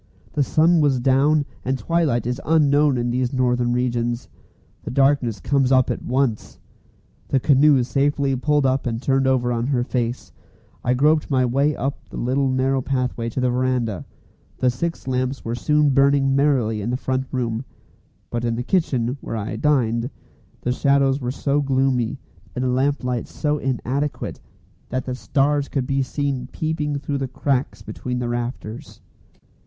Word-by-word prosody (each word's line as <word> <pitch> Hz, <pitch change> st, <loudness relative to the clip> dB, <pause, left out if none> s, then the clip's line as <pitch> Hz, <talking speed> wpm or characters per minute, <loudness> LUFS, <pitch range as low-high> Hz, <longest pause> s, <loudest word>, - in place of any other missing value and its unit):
The 145 Hz, -, +1 dB
sun 160 Hz, +5 st, +3 dB
was 140 Hz, -4 st, +2 dB
down, 140 Hz, +4 st, +3 dB, 0.2 s
and 130 Hz, +1 st, -1 dB
twilight 150 Hz, -8 st, 0 dB
is 125 Hz, +3 st, -2 dB
unknown 145 Hz, -3 st, +3 dB
in 120 Hz, 0 st, -1 dB
these 125 Hz, 0 st, 0 dB
northern 125 Hz, -2 st, +1 dB
regions. 120 Hz, -1 st, -1 dB, 0.5 s
The -, -, -7 dB
darkness 135 Hz, -5 st, +2 dB
comes 135 Hz, +4 st, +1 dB
up 130 Hz, -2 st, +4 dB
at -, -, -4 dB
once. 125 Hz, -4 st, -1 dB, 0.7 s
The 135 Hz, -, +2 dB
canoe 140 Hz, 0 st, +4 dB
safely 140 Hz, +2 st, +1 dB
pulled 145 Hz, +2 st, +1 dB
up 130 Hz, 0 st, +1 dB
and 115 Hz, -1 st, -2 dB
turned 135 Hz, +1 st, +1 dB
over 125 Hz, -2 st, +2 dB
on 120 Hz, 0 st, -1 dB
her 130 Hz, -3 st, +1 dB
face, 120 Hz, -1 st, -3 dB, 0.5 s
I 125 Hz, -, +2 dB
groped 150 Hz, +4 st, +2 dB
my 130 Hz, -3 st, +2 dB
way 140 Hz, +4 st, +1 dB
up 135 Hz, +1 st, -3 dB
the -, -, -8 dB
little 135 Hz, +3 st, 0 dB
narrow 130 Hz, +1 st, +1 dB
pathway 125 Hz, -3 st, -2 dB
to 115 Hz, -, -4 dB
the 125 Hz, -1 st, +1 dB
verandah. 125 Hz, -, -1 dB, 0.5 s
The 125 Hz, -, +2 dB
six 165 Hz, +4 st, -4 dB
lamps 130 Hz, +1 st, -2 dB
were 115 Hz, -, -2 dB
soon 150 Hz, +4 st, +2 dB
burning 135 Hz, 0 st, +3 dB
merrily 130 Hz, -7 st, +2 dB
in 105 Hz, -, -3 dB
the 125 Hz, -, 0 dB
front 130 Hz, 0 st, -2 dB
room; 120 Hz, -2 st, -2 dB, 0.7 s
but 120 Hz, 0 st, -2 dB
in 115 Hz, -1 st, 0 dB
the 120 Hz, -, -3 dB
kitchen, 130 Hz, -6 st, 0 dB
where 115 Hz, -, -4 dB
I 110 Hz, +1 st, -4 dB
"dined," 120 Hz, -5 st, +1 dB, 0.5 s
the 125 Hz, -, -1 dB
shadows 140 Hz, +1 st, +2 dB
were 125 Hz, -, -2 dB
so 140 Hz, +2 st, 0 dB
gloomy, 135 Hz, -3 st, +1 dB, 0.4 s
and 125 Hz, -, -2 dB
the 130 Hz, -, +1 dB
lamplight 125 Hz, -2 st, 0 dB
was -, -, -20 dB
so 150 Hz, -1 st, -1 dB
inadequate, 135 Hz, +2 st, -2 dB, 0.5 s
that 130 Hz, 0 st, -2 dB
the 130 Hz, -, -3 dB
stars 140 Hz, +2 st, 0 dB
could 135 Hz, -3 st, -1 dB
be 135 Hz, +1 st, 0 dB
seen 135 Hz, -1 st, -2 dB
peeping 155 Hz, -2 st, -2 dB
through 140 Hz, 0 st, -3 dB
the 135 Hz, -, -2 dB
cracks 135 Hz, +1 st, -2 dB
between 125 Hz, 0 st, -5 dB
the 120 Hz, -1 st, -2 dB
rafters. 120 Hz, +2 st, -5 dB
130 Hz, 170 wpm, -22 LUFS, 125-140 Hz, 0.7 s, up